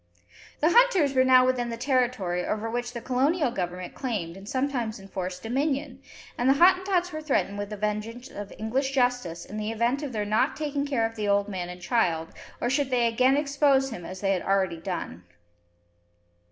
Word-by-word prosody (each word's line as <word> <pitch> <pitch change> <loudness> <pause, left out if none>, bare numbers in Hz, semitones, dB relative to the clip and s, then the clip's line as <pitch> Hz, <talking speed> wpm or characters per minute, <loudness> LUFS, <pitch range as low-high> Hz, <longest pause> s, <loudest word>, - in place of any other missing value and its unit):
The 315 +3 +4
hunters 385 - +4
were 260 -1 +4
now 255 -1 +6
within 250 -2 0
the 230 - -4
territory 240 -9 0
over 215 +1 -2
which 240 +1 -3
the 235 - -5
Colonial 275 +3 +1
Government 180 -4 -4
claimed 205 -11 -3
and 195 +2 -10
sometimes 255 -5 -1
enforced 185 -2 -6
dominion, 270 +2 -2 0.4
and 245 +2 +3
the 270 - +5
Hottentots 365 +1 +3
were 310 - -4
threatened 235 -9 0
with 205 0 -4
the 210 - -6
vengeance 210 +4 -3
of 205 -1 -8
English 265 +5 -1
justice 245 -10 0
in 210 - -8
the 215 0 -2
event 235 +5 0
of 290 -3 -4
their 210 -3 -2
not 215 +5 +1
taking 290 -1 -2
care 250 -5 +1
of 225 0 -4
the 210 -2 -2
old 200 0 +2
man 185 -3 -4
and 180 0 -9
child, 170 -9 +1 0.3
or - - -1
should 275 +2 +1
they 245 -2 +2
again 255 +4 +3
expose 280 -2 +2
him 180 -6 -7
as 185 +2 -8
they 195 -1 +1
had 185 - -1
already 190 -3 +1
done. 165 - -5
240 Hz, 195 wpm, -26 LUFS, 200-270 Hz, 0.4 s, now